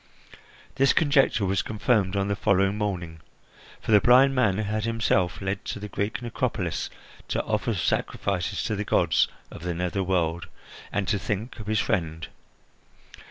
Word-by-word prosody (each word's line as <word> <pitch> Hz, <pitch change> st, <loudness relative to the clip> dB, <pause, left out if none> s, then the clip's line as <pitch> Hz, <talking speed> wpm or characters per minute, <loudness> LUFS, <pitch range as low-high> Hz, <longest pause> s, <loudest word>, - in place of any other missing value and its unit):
This 135 Hz, 0 st, +4 dB
conjecture 140 Hz, -8 st, +3 dB
was 95 Hz, 0 st, +1 dB
confirmed 105 Hz, -3 st, 0 dB
on 100 Hz, 0 st, 0 dB
the 100 Hz, -, 0 dB
following 100 Hz, 0 st, +2 dB
morning, 90 Hz, -6 st, -3 dB, 0.6 s
for -, -, -4 dB
the 105 Hz, -2 st, +7 dB
blind 130 Hz, +3 st, +6 dB
man 110 Hz, -7 st, +2 dB
had 110 Hz, 0 st, -1 dB
himself 110 Hz, -6 st, +1 dB
led 95 Hz, +1 st, -3 dB
to -, -, -4 dB
the 105 Hz, -, -6 dB
Greek 105 Hz, +5 st, -3 dB
necropolis 120 Hz, -, -2 dB, 0.4 s
to -, -, -1 dB
offer -, -, -1 dB
sacrifices 100 Hz, 0 st, -1 dB
to 110 Hz, -, -1 dB
the 105 Hz, -, -2 dB
gods -, -, +3 dB, 0.2 s
of -, -, -10 dB
the 90 Hz, 0 st, -3 dB
nether 90 Hz, +3 st, -1 dB
world 85 Hz, -2 st, 0 dB, 0.4 s
and 100 Hz, -2 st, -1 dB
to 100 Hz, +1 st, +1 dB
think 105 Hz, +5 st, -4 dB
of 105 Hz, -, -8 dB
his 110 Hz, 0 st, +1 dB
friend. 80 Hz, -2 st, -1 dB
100 Hz, 160 wpm, -26 LUFS, 95-110 Hz, 0.6 s, the